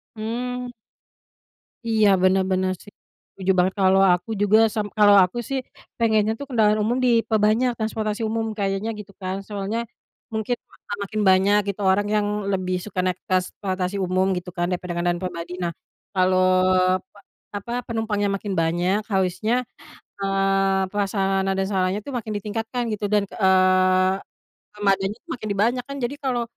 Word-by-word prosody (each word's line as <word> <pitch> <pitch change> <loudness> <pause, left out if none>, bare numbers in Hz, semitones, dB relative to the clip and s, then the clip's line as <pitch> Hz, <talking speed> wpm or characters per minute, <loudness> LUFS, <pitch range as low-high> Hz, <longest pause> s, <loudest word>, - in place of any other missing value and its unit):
Mmm. 245 +3 -4 1.1
Iya, 220 -2 +3 0.2
bener 190 0 +4
bener 185 0 +1
sih, 205 - -14 0.4
setuju 190 0 0
banget. 185 +1 +2
Kalau 190 0 +5
aku 180 +5 -3
juga 205 +1 +5 0.2
sam 215 -2 0
kalau 205 -1 +7
aku 180 +6 -2
sih 270 - 0 0.4
pengennya 220 -2 +3
tuh 280 - -5
kendaraan 215 -5 +2
umum 230 +3 +1
diperbanyak, 230 0 +3
transportasi 220 -1 -2
umum 225 0 -1
kayaknya 195 +1 -1
gitu 200 -1 -10
kan. 185 0 -3
Soalnya 205 +2 -3 0.5
mungkin 220 +2 -1 0.2
akan 205 - -7
makin 215 +2 -3
banyak 190 +2 +4
gitu 200 +1 -3
orang 205 +2 +1
yang 210 -1 +1 0.2
lebih 185 -1 -1
suka 190 -3 -5
naik 185 -1 -1
transportasi 185 0 -1
umum 185 +1 +1
gitu 180 0 -6
kan, 175 -1 0
daripada 180 -1 -3
kendaraan 175 0 0
pribadi. 175 -1 -5
Nah, 170 - -1 0.4
kalau 185 0 +3 0.7
pe 205 - -18 0.4
apa, 205 +4 -7 0.2
penumpangnya 220 -3 -1
makin 200 0 -4
banyak, 175 +5 +1
harusnya, 190 +4 0 0.7
eee, 195 0 +2
prasarana 195 -1 0
dan 195 - +1
sarannya 190 0 0
tuh 280 - -5
makin 220 -2 -4
ditingkatkan 225 +4 -3
gitu 210 -1 -4
dan, 210 - +4
eee, 185 -1 +3 0.6
armadanya 195 -1 +1
tuh - - -26
makin 230 -4 -7
di - - -1
banyak, 245 +2 0
kan 280 - -6
jadi 245 +3 -2
kalau 250 -3 0
200 Hz, 155 wpm, -23 LUFS, 185-220 Hz, 1.1 s, kalau